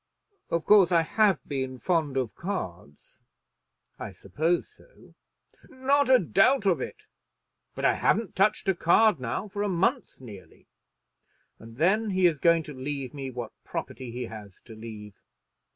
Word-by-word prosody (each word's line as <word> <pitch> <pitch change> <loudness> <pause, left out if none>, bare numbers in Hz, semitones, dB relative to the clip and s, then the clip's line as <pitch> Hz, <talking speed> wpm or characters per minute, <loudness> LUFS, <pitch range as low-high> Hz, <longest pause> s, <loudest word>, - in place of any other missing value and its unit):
Of 170 -1 -1
course 195 -4 +6
I 170 -2 +4
have 210 +3 +1
been 130 -2 -3
fond 155 -3 0
of 125 -4 -1
cards." 90 - -7 0.8
"I 105 - -6
suppose 155 - -1
so." - - -21 0.6
"Not 275 +2 +1
a 260 - +8
doubt 210 - +2
of 175 -8 +2
it. - - -7 0.7
But - - -3
I - - +5
haven't 215 -3 0
touched 200 +2 +2
a 195 - +4
card 180 +2 +3
now 125 - -3
for 205 0 -5
a 205 - 0
month 195 +9 -1
nearly. 105 -7 -13 0.9
And 115 +1 -13
then 205 +8 +2
he 185 -1 +2
is 160 -5 +3
going 170 0 +3
to 150 - -9
leave 135 0 -5
me 135 -2 -5
what 120 -3 -6
property 130 -2 -6
he 125 +2 -5
has 105 -4 -11
to 115 - -11
leave. 110 -2 -9
165 Hz, 155 wpm, -27 LUFS, 125-200 Hz, 0.9 s, a